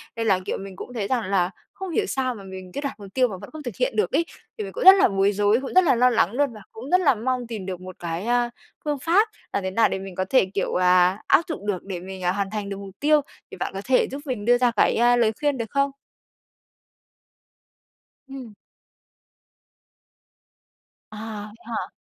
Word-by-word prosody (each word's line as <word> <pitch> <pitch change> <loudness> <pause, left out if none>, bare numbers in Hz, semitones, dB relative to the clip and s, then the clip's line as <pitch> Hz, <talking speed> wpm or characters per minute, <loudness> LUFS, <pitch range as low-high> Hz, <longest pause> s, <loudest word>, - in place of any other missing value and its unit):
Nên 225 -1 -2
là, 190 -3 +4
kiểu, - - -2
mình 195 -1 -8
cũng 245 - -9
thấy 215 -5 -2
rằng 245 -1 0
là 185 -3 +2 0.2
không 385 -1 -6
hiểu - - +1
sao 255 -2 -1
mà 200 - -10
mình 190 -1 -9
cứ 285 - -3
đặt 280 -5 -5
mục 200 - -9
tiêu 255 -1 +3
mà 200 -5 -6
vẫn 200 - -9
không 310 -1 -9
thực 245 - -5
hiện - - 0
được 430 - +1
ấy, 335 - +2 0.3
thì 435 - -3
mình - - -7
cũng - - -3
rất 380 +1 +11
là 390 - +5
bối 195 0 +2
rối, 205 +3 +2
cũng 265 - -6
rất 370 - +6
là 290 -7 +4
lo 250 +2 +5
lắng 225 -6 +2
luôn 280 -1 +1
và 215 - -11
cũng 245 +5 -9
rất 365 +1 +5
là 280 -7 +4
mong 250 +2 -2
tìm 220 -5 -6
được 185 -1 -5
một 185 0 -9
cái, 170 +2 -4
a, 240 0 +2 0.4
phương 295 -2 -1
pháp 350 - +3 0.3
làm 200 - -1
thế 190 - -2
nào 225 +4 +3
để - - -2
mình 190 -1 -8
có 185 - -1
thể, 260 - +4
kiểu 195 - -1
là, 180 +1 +4
áp - - +6
dụng 250 - -5
được 190 -4 -1
để 190 -3 -5
mình, 190 +1 -8
à, 180 - +2
hoàn 200 0 -2
thành 210 -2 -4
được 195 - -4
mục 195 -1 -10
tiêu, 300 +1 +4 0.3
thì - - -9
bạn - - -3
có 195 - -4
thể 255 0 +3
giúp 275 +2 -5
mình 245 -7 -4
đưa 245 +1 +5
ra 245 -1 +3
cái, 220 - +2
ơ, 240 +1 +4
lời 230 -2 +3
khuyên 290 -2 +1
được 230 -2 -4
không? 280 0 +1 2.4
Ừm. 265 -5 -9 2.6
À, 215 - -9 0.3
vậy 210 - -14
hả? 230 - -4
230 Hz, 235 wpm, -24 LUFS, 195-270 Hz, 2.6 s, rất